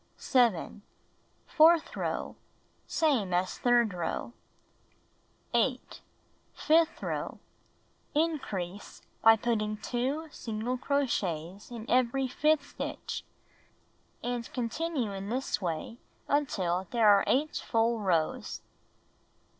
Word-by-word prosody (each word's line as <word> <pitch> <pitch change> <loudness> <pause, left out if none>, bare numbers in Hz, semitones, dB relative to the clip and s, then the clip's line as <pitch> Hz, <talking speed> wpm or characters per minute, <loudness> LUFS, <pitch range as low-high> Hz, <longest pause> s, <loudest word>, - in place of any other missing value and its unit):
7. 230 -6 +1 0.6
Fourth 325 +1 +4
row: - - -3 0.5
Same 250 - +1
as 180 +1 -1
third 240 -4 +3
row. 180 +6 -3 1.2
8. - - 0 0.5
Fifth 325 +1 +2
row: - - -3 0.8
In 320 0 +2
crease, 190 -3 -6 0.2
by 225 0 +8
putting 215 -2 -1
2 265 +8 -2
single 225 +1 -3
crochets 200 - -1
in 235 -2 -8
every 255 +2 +2
fifth 290 +2 +1
stitch, - - -5 1.0
and 240 -1 -3
con 240 -2 -1
tinue 270 -7 -2
in 195 +1 -5
this 255 -1 -1
way 175 +7 -4 0.3
until 190 -11 0
there 230 -3 +3
are 205 -1 +7
8 295 +4 +1
full 230 0 +1
rows. 170 -6 -1
235 Hz, 100 wpm, -30 LUFS, 200-275 Hz, 1.2 s, by